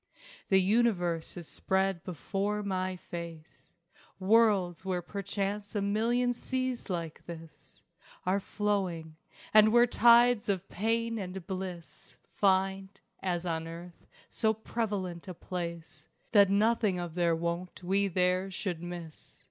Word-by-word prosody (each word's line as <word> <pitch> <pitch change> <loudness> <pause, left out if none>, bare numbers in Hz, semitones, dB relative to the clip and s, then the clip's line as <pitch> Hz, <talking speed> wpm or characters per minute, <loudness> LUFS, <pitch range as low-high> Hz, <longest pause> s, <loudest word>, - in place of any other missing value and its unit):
The 190 - +6
universe 185 -6 +1
is 170 -3 -8
spread 190 -2 0
before 200 +4 -2
my 185 -1 -1
face, 170 -2 -9 0.5
Worlds 195 -4 +3
where 185 -2 -2
perchance 200 +2 -4
a 205 - +1
million 235 +4 +1
seas 255 0 -3
like 170 -3 -4
this 165 -2 -11 0.4
Are 190 +2 +2
flowing 185 -7 -2 0.4
and 215 0 +7
where 240 +1 +6
tides 240 -1 +5
of 195 -1 -1
pain 230 +2 0
and 185 -2 -6
bliss 185 -3 -7
Find, 190 0 +1 0.3
as 175 -2 -1
on 165 -1 -2
earth, 170 +1 -10 0.2
so 220 -1 +1
prevalent 200 -6 -3
a 185 - -6
place 170 -3 -6 0.2
That 200 -3 +6
nothing 210 -1 +2
of 175 -2 -4
their 170 -1 +2
wont 170 +2 -4
we 195 +2 +2
there 185 +1 +1
should 185 -3 -4
miss. 175 -3 -9
190 Hz, 125 wpm, -30 LUFS, 175-210 Hz, 0.5 s, and